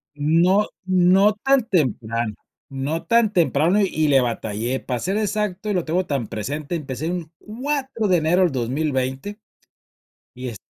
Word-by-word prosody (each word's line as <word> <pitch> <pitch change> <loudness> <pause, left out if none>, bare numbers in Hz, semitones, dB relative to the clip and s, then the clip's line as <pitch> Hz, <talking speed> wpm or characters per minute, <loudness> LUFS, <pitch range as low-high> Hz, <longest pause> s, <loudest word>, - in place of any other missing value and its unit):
No 170 +7 +3 0.2
no 185 +3 +4
tan 270 -2 +3
temprano, 115 - 0 0.3
no 140 +4 -3
tan 230 -3 +3
temprano 170 +1 +2
y 155 -6 +1
le 135 -2 +5
batallé 115 +1 -2
para 125 -2 -3
ser 190 - -1
exacto 210 -1 -2
y 205 - 0
lo 180 - 0
tengo 175 +4 0
tan 140 -8 -2
presente, 145 - -4
empecé 150 0 -4
un 175 -3 -5
4 260 -1 -3
de 180 -2 +4
enero 165 +4 +2
del 175 -5 +2
2020 135 - -2 1.0
y 125 +1 -6
est 115 -5 -7
165 Hz, 150 wpm, -22 LUFS, 135-200 Hz, 1.0 s, le